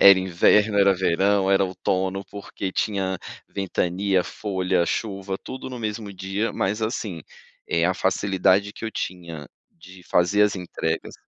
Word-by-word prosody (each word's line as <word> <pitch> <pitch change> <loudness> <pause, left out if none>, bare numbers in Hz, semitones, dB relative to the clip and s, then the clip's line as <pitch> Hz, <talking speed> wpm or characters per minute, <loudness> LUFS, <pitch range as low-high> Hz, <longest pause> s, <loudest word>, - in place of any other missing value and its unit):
Era 100 -1 +9
inverno, 100 +3 +3
era 100 0 +5
verão, 95 +2 +2
era 100 0 +4
outono, 95 +1 -1
porque 100 -1 -5
tinha 95 -3 -1 0.3
ventania, 95 0 0
folha, 95 -3 0
chuva, 100 -3 -2
tudo 130 0 -7
no 125 - -6
mesmo 105 -1 -4
dia, 95 +4 -2
mas 105 +3 -1
assim, 110 - -3 0.5
eh, 85 0 +2
a 90 - +2
facilidade 95 +1 +2
que - - -8
eu 110 - -4
tinha 85 -7 -5 0.2
de 90 +2 -15
fazer 90 +5 +2
as 105 -1 +3
entregas 80 -2 -3
95 Hz, 145 wpm, -24 LUFS, 90-100 Hz, 0.5 s, Era